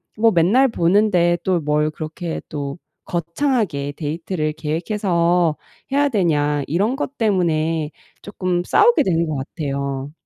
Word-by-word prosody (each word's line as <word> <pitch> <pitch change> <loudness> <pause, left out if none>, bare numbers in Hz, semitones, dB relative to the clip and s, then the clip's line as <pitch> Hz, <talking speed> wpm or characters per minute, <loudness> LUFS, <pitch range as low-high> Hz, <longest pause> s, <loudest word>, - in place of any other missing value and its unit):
뭐 225 +1 +4
'맨날 205 +10 +4
보는데 175 -3 +3
또 185 -2 +1
뭘 150 0 +1
그렇게 160 +2 -5
또 145 +1 -4 0.3
거창하게 170 - -1
데이트를 155 0 -3
계획해서 170 0 0 0.3
해야 285 +1 +3
되냐.' 150 - +1
이런 205 - +1
것 280 -1 -4
때문에 165 -7 +1 0.3
쪼끔 185 -3 -2
싸우게 465 - +4
되는 170 -3 +1
것 155 - -2
같아요. 140 -1 -4
170 Hz, 265 characters per minute, -20 LUFS, 150-200 Hz, 0.3 s, 뭐